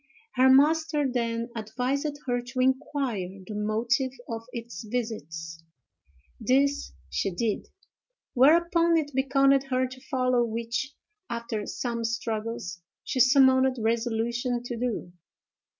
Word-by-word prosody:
Her 260 Hz, +1 st, +5 dB
master 300 Hz, +2 st, +4 dB
then 235 Hz, -1 st, -2 dB
advised 255 Hz, +7 st, -2 dB
her 245 Hz, -1 st, 0 dB
to 255 Hz, +2 st, -6 dB
inquire 260 Hz, -6 st, 0 dB, 0.2 s
the 215 Hz, -, -7 dB
motive 225 Hz, +5 st, 0 dB, 0.2 s
of 230 Hz, -1 st, -5 dB
its 235 Hz, -7 st, -7 dB
visits. 165 Hz, -8 st, -5 dB, 0.8 s
This 280 Hz, +2 st, +1 dB, 0.2 s
she 195 Hz, -, -1 dB
did: 210 Hz, +4 st, -2 dB, 0.7 s
whereupon, 335 Hz, +5 st, +4 dB
it 295 Hz, -2 st, -1 dB
beckoned 275 Hz, +1 st, +3 dB
her 255 Hz, 0 st, +2 dB
to 255 Hz, 0 st, -9 dB
follow, 255 Hz, -3 st, +2 dB
which, 235 Hz, +5 st, -3 dB, 0.3 s
after 230 Hz, -3 st, -4 dB
some 235 Hz, -2 st, -3 dB
struggles, 225 Hz, -5 st, -3 dB, 0.2 s
she 260 Hz, -, -3 dB
summoned 260 Hz, 0 st, +5 dB
resolution 235 Hz, +2 st, -1 dB
to 245 Hz, 0 st, -4 dB
do. 230 Hz, -7 st, -3 dB
245 Hz, 115 wpm, -27 LUFS, 225-265 Hz, 0.8 s, Her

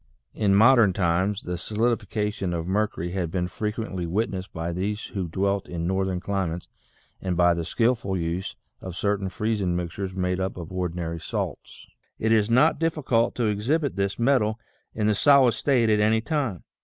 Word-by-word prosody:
In 100 Hz, -3 st, +2 dB
modern 110 Hz, -2 st, +6 dB
times 95 Hz, +3 st, 0 dB
the 90 Hz, -1 st, -4 dB
solidification 105 Hz, -3 st, -1 dB
of 80 Hz, -1 st, -3 dB
mercury 95 Hz, -3 st, -1 dB
had 90 Hz, -3 st, -2 dB
been 90 Hz, +1 st, -1 dB
frequently 105 Hz, -3 st, -3 dB
witnessed 95 Hz, 0 st, -2 dB
by 85 Hz, 0 st, -4 dB
these 105 Hz, +4 st, -2 dB
who 95 Hz, -3 st, -2 dB
dwelt 100 Hz, +3 st, -1 dB
in 85 Hz, -1 st, -3 dB
northern 95 Hz, 0 st, 0 dB
cli 95 Hz, 0 st, -1 dB
mates 85 Hz, +2 st, -5 dB, 0.5 s
and 90 Hz, -2 st, -2 dB
by 90 Hz, 0 st, +5 dB
the 85 Hz, 0 st, -2 dB
skilful 115 Hz, -1 st, 0 dB
use 85 Hz, +2 st, -3 dB, 0.3 s
of 95 Hz, -2 st, -7 dB
certain 100 Hz, +1 st, -1 dB
freezing 105 Hz, -3 st, -1 dB
mixtures 90 Hz, +2 st, -4 dB
made 90 Hz, 0 st, -1 dB
up 95 Hz, 0 st, -2 dB
of 85 Hz, -1 st, -7 dB
ordinary 85 Hz, -2 st, -3 dB
salts, -, -, -5 dB, 0.3 s
it 110 Hz, -, 0 dB
is 110 Hz, -1 st, +3 dB
not 130 Hz, +8 st, +4 dB
difficult 150 Hz, -8 st, +1 dB
to 120 Hz, -, 0 dB
exhibit 130 Hz, +9 st, 0 dB
this 100 Hz, 0 st, -1 dB
metal 115 Hz, -3 st, +2 dB, 0.4 s
in 110 Hz, -, 0 dB
the 105 Hz, -, +3 dB
solid 135 Hz, +3 st, +5 dB
state 120 Hz, +1 st, +2 dB
at 105 Hz, -1 st, +3 dB
any 110 Hz, +1 st, +3 dB
time. 125 Hz, -, -2 dB
100 Hz, 170 wpm, -25 LUFS, 90-110 Hz, 0.5 s, modern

